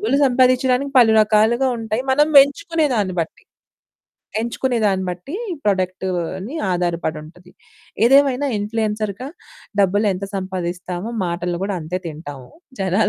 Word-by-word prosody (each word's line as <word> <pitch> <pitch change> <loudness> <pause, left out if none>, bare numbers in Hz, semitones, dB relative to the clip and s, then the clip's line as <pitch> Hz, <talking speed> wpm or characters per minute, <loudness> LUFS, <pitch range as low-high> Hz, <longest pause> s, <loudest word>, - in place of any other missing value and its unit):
డబ్బులు 410 -10 +1
సంపాదిచ్చడానికి 255 +1 +2
పలు 230 -3 +6
రకాలుగా 220 +4 +3
ఉంటాయి. 225 +2 -2
మనం 295 +3 +3
ఎంచుకునే 320 +3 -1
దాన్ని 200 -5 -1
బట్టి, 165 - -6 1.0
ఎంచుకునే 235 +1 -1
దాన్ని 190 -2 0
బట్టి 180 - -7 0.3
ప్రొడక్ట్‌ని 185 - -2 0.2
ఆధారపడుంటది. 175 0 -4 0.5
ఏదేమైనా 275 +1 +4
ఇన్ఫ్లుయెన్సర్‌గా 215 +2 -3 0.5
డబ్బులెంత 200 0 +1
సంపాదిస్తామో, 185 +1 -4 0.2
మాటలు 175 0 -3
కూడా 200 -1 -2
అంతే 170 +4 -3
తింటాము 145 -5 -9 0.3
జనాల 195 +3 +2
205 Hz, 105 wpm, -20 LUFS, 180-250 Hz, 1.0 s, పలు